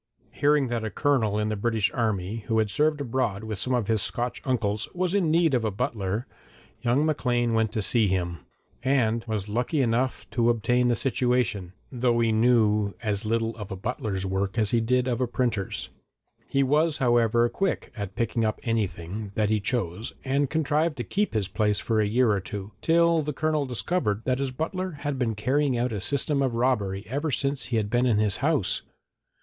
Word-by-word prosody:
Hearing 145 Hz, -1 st, +2 dB
that 120 Hz, -2 st, -2 dB
a 110 Hz, -, -2 dB
Colonel 110 Hz, -4 st, +1 dB
in 105 Hz, 0 st, 0 dB
the 110 Hz, -, -1 dB
British 110 Hz, 0 st, 0 dB
army 110 Hz, -4 st, -1 dB
who 115 Hz, -, +1 dB
had 110 Hz, -2 st, +1 dB
served 150 Hz, +5 st, +2 dB
abroad 120 Hz, -6 st, -1 dB
with 110 Hz, -3 st, -4 dB
some 125 Hz, +4 st, 0 dB
of 120 Hz, -4 st, 0 dB
his 110 Hz, -2 st, +1 dB
Scotch 120 Hz, +1 st, -2 dB
uncles 110 Hz, -5 st, -1 dB
was 180 Hz, 0 st, 0 dB
in 190 Hz, -5 st, +2 dB
need 165 Hz, -1 st, +3 dB
of 120 Hz, -3 st, +2 dB
a 110 Hz, -, +1 dB
butler, 105 Hz, -1 st, -2 dB, 0.6 s
young 125 Hz, +5 st, +2 dB
Maclean 120 Hz, -6 st, +1 dB
went 110 Hz, -1 st, +1 dB
to 110 Hz, -, -1 dB
see 110 Hz, 0 st, +3 dB
him, 90 Hz, -3 st, -1 dB, 0.4 s
and 120 Hz, -4 st, +1 dB
was 105 Hz, -3 st, -2 dB
lucky 125 Hz, +8 st, -1 dB
enough 120 Hz, -4 st, 0 dB
to 120 Hz, 0 st, +2 dB
obtain 125 Hz, +2 st, +2 dB
the 120 Hz, -, +3 dB
situation, 120 Hz, -6 st, 0 dB, 0.2 s
though 120 Hz, -2 st, +1 dB
he 115 Hz, -1 st, +2 dB
knew 110 Hz, -3 st, +3 dB
as 105 Hz, 0 st, -1 dB
little 115 Hz, 0 st, 0 dB
of 105 Hz, -3 st, -7 dB
a -, -, -4 dB
butler's 105 Hz, -2 st, -3 dB
work 95 Hz, +2 st, -2 dB
as 110 Hz, -2 st, +2 dB
he 115 Hz, -, +3 dB
did 125 Hz, +2 st, +1 dB
of 125 Hz, 0 st, -1 dB
a 125 Hz, -, +1 dB
printer's. 115 Hz, -5 st, -1 dB, 0.6 s
He 135 Hz, -, +2 dB
was, 150 Hz, +4 st, +2 dB
however, 120 Hz, -2 st, +3 dB
quick 195 Hz, +7 st, -2 dB
at 100 Hz, -3 st, -6 dB
picking 115 Hz, 0 st, 0 dB
up 110 Hz, -1 st, 0 dB
anything 105 Hz, -3 st, -2 dB
that 105 Hz, -1 st, +1 dB
he 110 Hz, -, +2 dB
chose 105 Hz, -2 st, -2 dB
and 135 Hz, +1 st, +1 dB
contrived 155 Hz, 0 st, 0 dB
to 120 Hz, -, -2 dB
keep 210 Hz, +9 st, 0 dB
this 105 Hz, -4 st, 0 dB
place 105 Hz, +1 st, 0 dB
for 110 Hz, -2 st, +1 dB
a 105 Hz, -, +1 dB
year 120 Hz, +2 st, +3 dB
or 100 Hz, -, +1 dB
two, 100 Hz, +2 st, -7 dB
till 170 Hz, 0 st, +3 dB
the 150 Hz, 0 st, -3 dB
Colonel 155 Hz, -1 st, 0 dB
discovered 120 Hz, -, -1 dB
that 130 Hz, 0 st, +1 dB
his 140 Hz, -1 st, -1 dB
butler 170 Hz, +7 st, -3 dB
had 145 Hz, -2 st, -2 dB
been 115 Hz, -4 st, 0 dB
carrying 130 Hz, +4 st, +1 dB
out 120 Hz, 0 st, 0 dB
a 105 Hz, -, -2 dB
system 140 Hz, +8 st, +1 dB
of 130 Hz, -4 st, 0 dB
robbery 105 Hz, -6 st, 0 dB
ever 145 Hz, +7 st, -2 dB
since 140 Hz, +1 st, -1 dB
he 120 Hz, -, -1 dB
had 105 Hz, -1 st, -1 dB
been 125 Hz, +1 st, +2 dB
in 115 Hz, -4 st, +3 dB
his 105 Hz, -2 st, +2 dB
house. -, -, +1 dB
120 Hz, 200 wpm, -26 LUFS, 105-130 Hz, 0.6 s, need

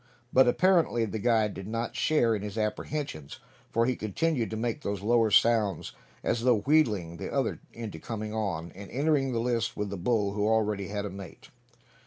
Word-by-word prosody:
But 130 Hz, 0 st, +6 dB
apparently 165 Hz, -6 st, +3 dB
the 110 Hz, +1 st, -4 dB
guide 110 Hz, -2 st, +2 dB
did 95 Hz, -, -8 dB
not 115 Hz, +2 st, -3 dB
share 120 Hz, -2 st, +2 dB
in 105 Hz, -, -4 dB
his 105 Hz, +1 st, -6 dB
apprehensions; 110 Hz, -, -3 dB, 0.3 s
for 115 Hz, 0 st, +2 dB
he 130 Hz, +1 st, +1 dB
continued 120 Hz, +4 st, -1 dB
to 110 Hz, -, -4 dB
make 120 Hz, +5 st, -2 dB
those 100 Hz, -4 st, -3 dB
lower 115 Hz, 0 st, +3 dB
sounds, 105 Hz, -4 st, +3 dB, 0.3 s
as 115 Hz, -, 0 dB
though 120 Hz, -3 st, +3 dB
wheedling 105 Hz, -, +2 dB
the -, -, -5 dB
other -, -, -1 dB
into 110 Hz, -8 st, -7 dB
coming 110 Hz, +2 st, -5 dB
on, 90 Hz, -7 st, -3 dB
and 100 Hz, +2 st, -10 dB
entering 140 Hz, 0 st, +1 dB
the 120 Hz, -, -1 dB
lists 115 Hz, -2 st, -1 dB
with 105 Hz, -1 st, -3 dB
the 100 Hz, -, -4 dB
bull 100 Hz, +1 st, 0 dB
who 105 Hz, 0 st, 0 dB
already 105 Hz, -3 st, +1 dB
had 105 Hz, 0 st, -3 dB
a 100 Hz, -, -5 dB
mate. 95 Hz, -3 st, -10 dB
110 Hz, 190 wpm, -28 LUFS, 100-120 Hz, 0.3 s, But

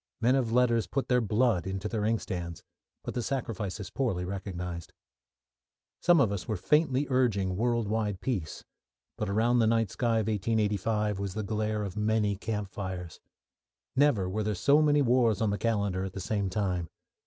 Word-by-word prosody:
Men 120 Hz, +1 st, +3 dB
of 130 Hz, -4 st, +1 dB
letters 120 Hz, -2 st, +3 dB
put 135 Hz, -, -2 dB
their 125 Hz, -1 st, +4 dB
blood 110 Hz, -3 st, +1 dB
into 95 Hz, +2 st, -3 dB
their 105 Hz, -1 st, -2 dB
inkstands, 90 Hz, -7 st, -2 dB, 0.4 s
but -, -, -5 dB
the 125 Hz, -, -1 dB
sacrifice 110 Hz, -7 st, -3 dB
is 100 Hz, -, -7 dB
poorly 110 Hz, -10 st, -1 dB
recognised. 90 Hz, -3 st, -5 dB, 1.1 s
Some 175 Hz, -2 st, +5 dB
of 120 Hz, -7 st, +3 dB
us 100 Hz, -3 st, -4 dB
were 110 Hz, -, -1 dB
faintly 145 Hz, -, +2 dB
urging 100 Hz, -8 st, +1 dB
world 115 Hz, +1 st, 0 dB
wide 105 Hz, -3 st, -1 dB
peace, 95 Hz, -, -3 dB, 0.5 s
but 105 Hz, -, -3 dB
around 115 Hz, +4 st, +2 dB
the 115 Hz, -, +4 dB
night 115 Hz, -3 st, +2 dB
sky 120 Hz, -2 st, 0 dB
of 110 Hz, -, +1 dB
1885 105 Hz, -1 st, 0 dB
was 100 Hz, -1 st, -4 dB
the 110 Hz, -, -2 dB
glare 105 Hz, +1 st, -1 dB
of 100 Hz, 0 st, -6 dB
many 105 Hz, -1 st, +1 dB
camp 105 Hz, -1 st, -4 dB
fires. 95 Hz, -4 st, -6 dB, 0.8 s
Never 130 Hz, -9 st, +3 dB
were 100 Hz, +4 st, -2 dB
there 105 Hz, 0 st, -1 dB
so 145 Hz, +11 st, +4 dB
many 145 Hz, -1 st, +4 dB
wars 120 Hz, -4 st, +3 dB
on 110 Hz, -2 st, +1 dB
the 105 Hz, -, -2 dB
calendar 100 Hz, -5 st, 0 dB
at 95 Hz, -1 st, -5 dB
the -, -, -5 dB
same 100 Hz, +1 st, -1 dB
time. 90 Hz, -4 st, -1 dB
105 Hz, 175 wpm, -29 LUFS, 95-120 Hz, 1.1 s, Some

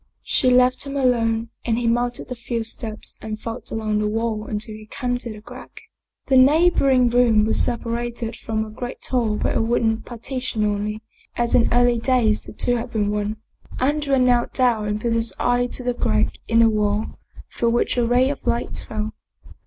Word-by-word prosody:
She 255 Hz, -, +2 dB
left 250 Hz, 0 st, +4 dB
him 275 Hz, 0 st, -4 dB
alone 230 Hz, -3 st, +1 dB
and 230 Hz, -1 st, 0 dB
he 240 Hz, -, -2 dB
mounted 240 Hz, +1 st, 0 dB
the 250 Hz, -, -5 dB
few 235 Hz, -1 st, -3 dB
steps 220 Hz, -1 st, -3 dB
and 215 Hz, -1 st, -5 dB
felt 230 Hz, +2 st, -6 dB
along 215 Hz, -1 st, -1 dB
the 210 Hz, -, 0 dB
wall 220 Hz, 0 st, -2 dB
until 215 Hz, 0 st, -4 dB
he 215 Hz, 0 st, -11 dB
came 245 Hz, 0 st, -2 dB
to 240 Hz, -2 st, -6 dB
the 210 Hz, -1 st, -10 dB
crack. -, -, -11 dB, 0.5 s
The 265 Hz, -, +3 dB
neigh 310 Hz, +7 st, +6 dB
boring 260 Hz, -6 st, +3 dB
room 235 Hz, -3 st, +4 dB
was 220 Hz, -, +2 dB
separated 235 Hz, 0 st, -3 dB
from 220 Hz, -1 st, -3 dB
the 220 Hz, -, -8 dB
great 245 Hz, +3 st, -6 dB
hall 235 Hz, -5 st, 0 dB
by -, -, -1 dB
a -, -, +1 dB
wooden 225 Hz, -1 st, +1 dB
partition 245 Hz, -1 st, -3 dB
only, 210 Hz, +1 st, -2 dB, 0.3 s
as 240 Hz, -1 st, 0 dB
in 235 Hz, -, +4 dB
earlier 245 Hz, -1 st, +3 dB
days 235 Hz, -4 st, +2 dB
the -, -, -11 dB
two 245 Hz, 0 st, 0 dB
had 235 Hz, +1 st, -5 dB
been 210 Hz, -3 st, 0 dB
one. 210 Hz, +1 st, -2 dB, 0.4 s
Andrea 280 Hz, +1 st, +1 dB
knelt 250 Hz, -2 st, +2 dB
down 235 Hz, -5 st, +2 dB
and 210 Hz, 0 st, -1 dB
put 230 Hz, +1 st, -1 dB
his 230 Hz, 0 st, 0 dB
eye 245 Hz, 0 st, +1 dB
to 250 Hz, -, -6 dB
the 245 Hz, 0 st, 0 dB
crack 105 Hz, -, 0 dB
in 230 Hz, 0 st, +4 dB
the 225 Hz, -, +6 dB
wall, 210 Hz, 0 st, -1 dB, 0.4 s
through 235 Hz, -, +1 dB
which 240 Hz, +1 st, +1 dB
a 245 Hz, -, +2 dB
ray 250 Hz, +3 st, +3 dB
of 285 Hz, -, -8 dB
light 235 Hz, -, -1 dB
fell. 215 Hz, 0 st, -4 dB
235 Hz, 200 wpm, -22 LUFS, 220-245 Hz, 0.5 s, neigh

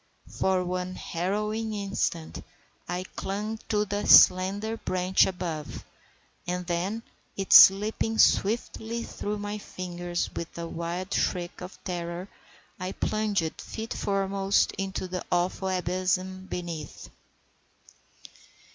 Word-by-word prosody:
For 190 Hz, -1 st, 0 dB
one 180 Hz, +1 st, -3 dB
harrowing 210 Hz, +5 st, -2 dB
instant 195 Hz, -5 st, -2 dB, 0.5 s
I 180 Hz, +1 st, -2 dB
clung 210 Hz, +3 st, -3 dB
to 210 Hz, -1 st, +2 dB
the 205 Hz, +1 st, -2 dB
slender 200 Hz, +4 st, +6 dB
branch 185 Hz, -3 st, +2 dB
above, 170 Hz, -5 st, -5 dB, 0.6 s
and 180 Hz, 0 st, -2 dB
then, 185 Hz, +6 st, -2 dB, 0.3 s
it 195 Hz, -1 st, +1 dB
slipping 215 Hz, +3 st, +7 dB
swiftly 225 Hz, +2 st, +2 dB
through 210 Hz, +1 st, -4 dB
my 205 Hz, +1 st, -4 dB
fingers, 175 Hz, -2 st, -4 dB
with 170 Hz, -, -6 dB
a 170 Hz, -, -4 dB
wild 170 Hz, +4 st, -4 dB
shriek 175 Hz, -2 st, -1 dB
of 180 Hz, +1 st, -8 dB
terror 175 Hz, 0 st, -4 dB, 0.5 s
I 185 Hz, +1 st, -4 dB
plunged 205 Hz, -7 st, -1 dB
feet 225 Hz, 0 st, -6 dB
foremost 195 Hz, 0 st, +1 dB
into 195 Hz, -2 st, -4 dB
the 180 Hz, -1 st, -4 dB
awful 180 Hz, +2 st, 0 dB
abyss 185 Hz, 0 st, +1 dB
beneath. 185 Hz, -4 st, -7 dB
185 Hz, 110 wpm, -27 LUFS, 180-205 Hz, 0.6 s, slipping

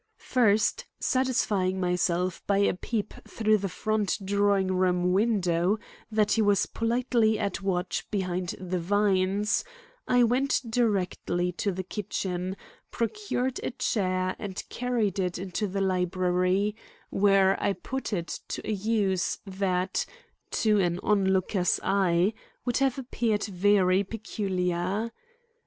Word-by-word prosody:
First, 240 Hz, -, +2 dB
satisfying 210 Hz, -8 st, +1 dB
myself 180 Hz, 0 st, 0 dB
by 200 Hz, -, +3 dB
a 200 Hz, -, +3 dB
peep 210 Hz, +3 st, -3 dB
through 215 Hz, -1 st, +2 dB
the 195 Hz, 0 st, -2 dB
front 215 Hz, +2 st, 0 dB
drawing 200 Hz, -1 st, +2 dB
room 180 Hz, -1 st, +2 dB
window 190 Hz, -3 st, +2 dB, 0.3 s
that 215 Hz, -1 st, +2 dB
he 225 Hz, -, +3 dB
was 205 Hz, -2 st, +3 dB
positively 230 Hz, -1 st, +1 dB
at 200 Hz, -2 st, -2 dB
watch 185 Hz, -2 st, -2 dB
behind 185 Hz, -3 st, -2 dB
the 185 Hz, -1 st, -2 dB
vines, 200 Hz, +2 st, +1 dB, 0.4 s
I 245 Hz, -1 st, +4 dB
went 255 Hz, +4 st, +2 dB
directly 195 Hz, -6 st, 0 dB
to 200 Hz, +3 st, -1 dB
the 185 Hz, 0 st, -4 dB
kitchen, 185 Hz, -1 st, -3 dB, 0.3 s
procured 255 Hz, -, -2 dB
a -, -, -2 dB
chair 185 Hz, -6 st, -1 dB
and 200 Hz, -3 st, -5 dB
carried 230 Hz, -6 st, -1 dB
it 180 Hz, -2 st, -1 dB
into 190 Hz, +3 st, -3 dB
the 195 Hz, +1 st, -2 dB
library, 185 Hz, +2 st, +1 dB, 0.4 s
where 195 Hz, -1 st, +4 dB
I 200 Hz, -, +2 dB
put 265 Hz, +5 st, -5 dB
it 175 Hz, -5 st, -3 dB
to -, -, -5 dB
a -, -, 0 dB
use 200 Hz, -3 st, 0 dB
that, 190 Hz, -1 st, -1 dB, 0.5 s
to 215 Hz, -2 st, +2 dB
an 175 Hz, -2 st, +1 dB
onlooker's 190 Hz, -2 st, +2 dB
eye, 190 Hz, 0 st, +2 dB, 0.3 s
would 245 Hz, -2 st, +1 dB
have 270 Hz, -1 st, +1 dB
appeared 235 Hz, -5 st, -1 dB
very 195 Hz, -1 st, +3 dB
peculiar. 195 Hz, -1 st, -2 dB
195 Hz, 125 wpm, -27 LUFS, 185-215 Hz, 0.5 s, I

